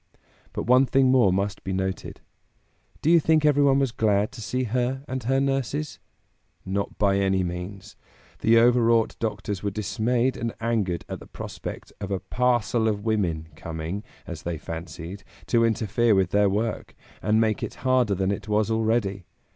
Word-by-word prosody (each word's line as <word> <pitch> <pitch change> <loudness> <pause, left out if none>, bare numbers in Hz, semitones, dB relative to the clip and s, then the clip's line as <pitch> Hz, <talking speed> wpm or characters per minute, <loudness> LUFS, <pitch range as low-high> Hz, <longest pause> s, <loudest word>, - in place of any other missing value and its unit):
But - - -3
one 125 +2 +5
thing 135 -1 +4
more 125 -7 +5
must 100 +1 -1
be 95 - -3
noted. 95 0 -3 0.8
Do 160 - +4
you 170 - +7
think 160 -1 +3
everyone 140 -2 +4
was 135 -3 +1
glad 105 -2 +1
to 125 -3 -10
see 125 +5 -2
her 125 +3 -1
and 130 0 -3
her 135 +2 +2
nurses? 135 +2 -1 0.7
Not 100 +1 -3
by 100 -1 +2
any 95 -1 +2
means! 90 +3 -6 0.4
The 115 +1 +4
overwrought 115 -1 +4
doctors 105 -3 -3
were 105 - -1
dismayed 110 +6 0
and 115 -1 -3
angered 110 -7 -1
at - - -6
the - - -13
prospect - - -8
of 100 - -4
a 95 -2 -1
"parcel 120 +2 +1
of 105 -1 -1
women" 85 -8 0
coming 80 +6 -5 0.2
as - - -7
they 85 -1 -3
fancied 85 +4 -7 0.2
to 115 -1 +3
interfere 115 0 +2
with 95 -2 +2
their 100 0 +4
work, 110 +3 -2 0.3
and 105 +3 +2
make 110 -2 +1
it - - -4
harder 125 -5 +3
than 95 +1 0
it 100 0 -4
was 105 +1 +1
already. 110 -4 0
110 Hz, 170 wpm, -25 LUFS, 95-125 Hz, 0.8 s, you